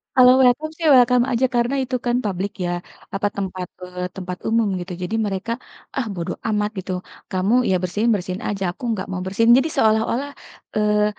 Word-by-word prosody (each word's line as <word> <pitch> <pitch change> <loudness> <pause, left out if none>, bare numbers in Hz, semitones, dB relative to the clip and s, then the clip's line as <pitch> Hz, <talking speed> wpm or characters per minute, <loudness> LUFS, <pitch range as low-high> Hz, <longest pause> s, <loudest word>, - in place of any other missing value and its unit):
kalau 250 -1 +8
welcome 260 +5 +3
sih 330 - -3
welcome 250 -1 +5
aja, 245 +2 +2
karena 240 +3 +2
itu 255 0 -3
kan 240 0 +2
public 195 0 -2
ya, 175 - -1 0.4
apa 205 +1 +1
tempat, 185 -2 -4 0.2
eee, 180 0 -7
tempat 180 -2 -5
umum 225 -1 +2
gitu. 180 +1 -7
Jadi 205 +5 -2
mereka, 195 +3 -3 0.5
ah, 265 - 0
bodo 170 -3 -3
amat 210 -1 +1
gitu, 190 0 -5 0.4
kamu, 190 +3 +1 0.2
ya 190 - +3
bersihin, 210 +6 0
bersihin 185 -1 -4
aja, 195 -2 -2
aku 180 - -16
enggak 195 -4 -3
mau 185 -1 -3
bersihin. 225 +5 +3
Jadi 275 +5 +2
seolah-olah, 220 +5 +2 0.5
eee, 210 0 +3
210 Hz, 180 wpm, -22 LUFS, 185-240 Hz, 0.5 s, kalau